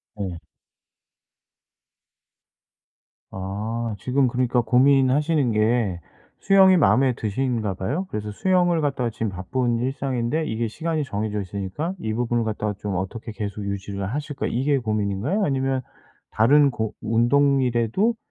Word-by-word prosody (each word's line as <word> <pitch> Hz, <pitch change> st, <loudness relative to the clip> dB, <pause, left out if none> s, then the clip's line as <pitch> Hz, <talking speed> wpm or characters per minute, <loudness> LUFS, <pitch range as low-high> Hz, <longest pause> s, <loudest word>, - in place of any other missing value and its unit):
네. 95 Hz, -5 st, -5 dB, 2.9 s
아 105 Hz, +4 st, -4 dB
지금 130 Hz, +3 st, +1 dB
그러니까 125 Hz, 0 st, +1 dB
고민하시는 135 Hz, +3 st, +3 dB
게 110 Hz, -4 st, +1 dB, 0.4 s
수영이 190 Hz, -1 st, +6 dB
마음에 135 Hz, -4 st, +4 dB
드신가 110 Hz, -2 st, -2 dB
봐요? 145 Hz, -, -3 dB
그래서 105 Hz, 0 st, -4 dB
수영을 175 Hz, -, +2 dB
갖다가 135 Hz, -5 st, 0 dB
지금 110 Hz, -1 st, -3 dB
바쁜 115 Hz, +6 st, -1 dB
일상인데 130 Hz, +3 st, -1 dB
이게 115 Hz, +1 st, -1 dB
시간이 160 Hz, +6 st, -2 dB
정해져 105 Hz, -3 st, -3 dB
있으니까 100 Hz, -, -4 dB
이 110 Hz, 0 st, -3 dB
부분을 120 Hz, 0 st, 0 dB
갖다가 105 Hz, -1 st, -2 dB
좀 100 Hz, -3 st, -3 dB
어떻게 110 Hz, +5 st, -4 dB
계속 105 Hz, -1 st, -5 dB
유지를 100 Hz, 0 st, -4 dB
하실까 145 Hz, -1 st, -3 dB
이게 135 Hz, +4 st, +1 dB
고민인가요? 110 Hz, -, -1 dB
아니면 135 Hz, -1 st, 0 dB, 0.5 s
다른 140 Hz, +5 st, +4 dB
고 110 Hz, -2 st, -3 dB
운동이라도 125 Hz, -, +2 dB
120 Hz, 300 characters per minute, -23 LUFS, 105-140 Hz, 2.9 s, 수영이